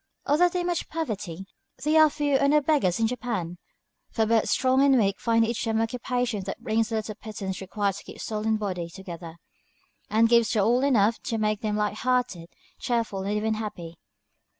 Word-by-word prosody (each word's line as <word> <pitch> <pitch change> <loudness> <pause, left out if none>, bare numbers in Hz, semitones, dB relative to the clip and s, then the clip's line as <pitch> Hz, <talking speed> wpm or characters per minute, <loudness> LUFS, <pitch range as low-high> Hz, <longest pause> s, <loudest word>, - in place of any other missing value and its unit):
Although 335 +5 +4
there 355 0 -2
is - - -4
much 350 -1 -2
poverty, 205 - -4 0.4
there 310 +2 +5
are 310 - +7
few 290 -2 +1
or 280 - +3
no 300 +1 +5
beggars 275 - +1
in 225 - +3
Japan, 220 -8 -3 0.5
for 225 - 0
both 225 0 +2
strong 260 +1 +3
and 275 -2 +5
weak 200 -4 +1
find 230 -1 +2
each 230 0 -2
some 225 -1 0
occupation 240 -1 -1
that 195 - -5
brings 225 -1 0
the 225 - -2
little 215 0 -3
pittance 200 -3 -6
required 200 +1 -1
to - - -10
keep - - -11
soul 215 0 -3
and 220 0 +2
body 180 -5 -3
together, 170 -2 -9 0.7
and 225 +1 +4
gives 235 -1 +4
to 220 - +2
all 240 +6 +3
enough 230 -5 +3
to 225 - -3
make 215 -1 0
them 210 -1 -1
light 210 0 -1
hearted, 245 -9 -1 0.3
cheerful, 230 -5 -1
and 205 +2 -1
even 220 +1 0
happy. 175 -6 -6
220 Hz, 195 wpm, -26 LUFS, 200-250 Hz, 0.7 s, are